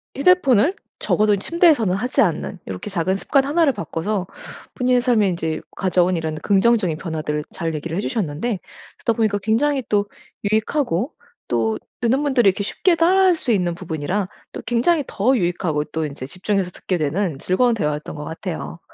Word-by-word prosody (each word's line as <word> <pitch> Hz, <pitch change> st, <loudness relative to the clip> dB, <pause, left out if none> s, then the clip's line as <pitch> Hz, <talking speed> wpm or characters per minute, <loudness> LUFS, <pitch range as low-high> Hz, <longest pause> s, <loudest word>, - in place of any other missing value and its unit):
휴대폰을 285 Hz, -, +4 dB, 0.3 s
적어도 210 Hz, -1 st, +2 dB
침대에서는 290 Hz, -, +3 dB
하지 250 Hz, +6 st, +1 dB
않는 185 Hz, -1 st, -1 dB
요렇게 95 Hz, -, -5 dB
작은 190 Hz, -1 st, 0 dB
습관 270 Hz, +7 st, +2 dB
1 325 Hz, +4 st, +3 dB
를 275 Hz, -, +3 dB
바꿔서 200 Hz, -1 st, -3 dB, 0.5 s
본인의 250 Hz, -1 st, +2 dB
삶에 235 Hz, -5 st, +3 dB
인제 160 Hz, -3 st, -2 dB, 0.2 s
가져온 185 Hz, -1 st, +2 dB
이런 160 Hz, -2 st, -2 dB
긍정적인 195 Hz, -2 st, +2 dB
변화들을 155 Hz, -3 st, -3 dB
잘 165 Hz, -1 st, -3 dB
얘기를 165 Hz, +3 st, -4 dB
해주셨는데 205 Hz, -, -2 dB, 0.4 s
듣다 230 Hz, -, +1 dB
보니까 215 Hz, -2 st, +1 dB
굉장히 250 Hz, +7 st, +1 dB
또 205 Hz, -1 st, +2 dB, 0.5 s
유익하고 220 Hz, -, 0 dB, 0.4 s
또 110 Hz, -2 st, +1 dB, 0.2 s
듣는 255 Hz, +5 st, +2 dB
분들이 260 Hz, -7 st, +3 dB
이렇게 200 Hz, +2 st, -1 dB
쉽게 340 Hz, -, +1 dB
따라 360 Hz, +4 st, +4 dB
할 365 Hz, -2 st, +5 dB
수 260 Hz, -, -2 dB
있는 180 Hz, -5 st, +1 dB
부분이라 180 Hz, +3 st, -3 dB, 0.2 s
또 -, -, -6 dB
굉장히 250 Hz, +8 st, +2 dB
더 250 Hz, +7 st, +2 dB
유익하고 175 Hz, -4 st, 0 dB
또 160 Hz, +1 st, -3 dB
인제 140 Hz, -3 st, -6 dB
집중해서 190 Hz, +3 st, -1 dB
듣게 185 Hz, -, -3 dB
되는 160 Hz, +1 st, -1 dB
즐거운 235 Hz, -, +2 dB
대화였던 150 Hz, -8 st, -2 dB
것 150 Hz, -, -6 dB
같아요. 165 Hz, +1 st, -6 dB
200 Hz, 385 characters per minute, -21 LUFS, 165-245 Hz, 0.5 s, 할